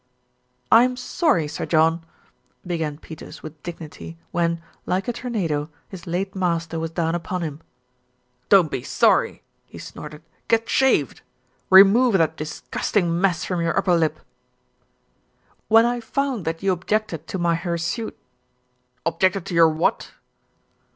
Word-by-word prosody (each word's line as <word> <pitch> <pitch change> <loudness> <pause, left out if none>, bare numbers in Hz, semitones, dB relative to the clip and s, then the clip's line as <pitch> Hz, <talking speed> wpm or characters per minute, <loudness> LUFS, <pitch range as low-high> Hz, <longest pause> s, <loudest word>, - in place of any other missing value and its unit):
"I'm 250 +2 +5
sorry, 250 - +1
Sir 150 0 -5
John 165 +1 +2 0.3
" - - -42
began 160 -4 -3
Peters 160 0 -11
with 155 -1 -10
dignity 150 - -9
when, 170 -1 0 0.3
like 185 +1 -1
a 240 - -1
tornado, 175 -12 -2 0.2
his 185 -1 -10
late 190 +3 -2
master 170 -3 -1
was 165 0 -3
down 165 0 -1
upon 175 +1 -3
him. 155 -1 -5 0.9
"Don't 185 -6 +5
be - - -2
sorry!" - - +2 0.2
he - - -12
snorted. 150 +1 -10 0.2
"Get 230 0 +2
shaved! 265 -1 +2 0.5
Re 190 +1 +11
move 235 +4 +3
that 160 -2 +1
disgusting 170 +3 -2
mess 185 -3 +1
from 180 -2 -2
your 170 0 0
upper 180 - +2
lip." 160 -2 0 1.5
"When 225 +1 +6
I 240 0 0
found 255 -2 -2
that 165 +3 -3
you 195 - +3
objected 185 -3 -2
to - - -4
my 170 -1 +1
hirsute 170 +5 -3 0.5
" 125 0 -45
"Objected 185 +2 +1
to - - -6
your 165 -1 +6
what?" 160 +2 -1
170 Hz, 145 wpm, -23 LUFS, 160-195 Hz, 1.5 s, Re